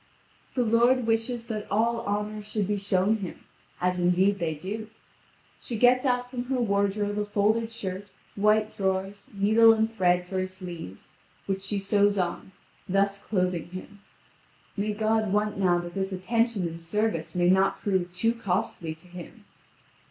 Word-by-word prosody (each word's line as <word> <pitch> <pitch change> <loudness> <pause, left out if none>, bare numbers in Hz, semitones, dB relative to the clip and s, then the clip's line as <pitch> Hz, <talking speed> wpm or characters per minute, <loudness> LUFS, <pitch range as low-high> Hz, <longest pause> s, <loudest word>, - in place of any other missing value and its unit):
The 250 - +2
lord 240 +2 +3
wishes 230 +1 0
that 215 -3 -5
all 230 +3 +1
honour 210 +1 -2
should 210 -1 -2
be 205 0 0
shown 200 +2 +1
him, 190 -4 -7 0.4
as 180 0 0
indeed 185 +3 +3
they 165 -2 -1
do. 205 +8 -5 0.7
She 235 - -5
gets 250 +3 +4
out 250 -1 +1
from 245 -1 -5
her 260 0 -1
wardrobe 205 -1 0
a 210 - 0
folded 215 +2 +1
shirt, 200 -3 -5 0.3
white 215 +1 +2
drawers, 195 +1 -2
needle 220 +3 +5
and 220 0 0
thread 180 -2 +2
for 190 +1 -2
his 185 0 -3
sleeves, 170 - -9 0.3
which 195 -1 -2
she 200 +1 -2
sews 200 +1 +2
on, 180 +1 -2 0.4
thus 195 +1 +1
clothing 180 -5 -1
him. 185 +2 -10 0.7
May 210 +1 -1
God 220 -1 +1
want 210 0 0
now 180 -2 +3
that 175 0 -5
this 195 0 -2
attention 215 +1 0
and 165 0 -8
service 165 -3 -1
may 175 0 +4
not 190 +1 +2
prove 190 -3 0
too 225 +6 +1
costly 180 -6 -2
to 160 +3 -19
him! 180 -1 -11
200 Hz, 160 wpm, -27 LUFS, 185-220 Hz, 0.7 s, needle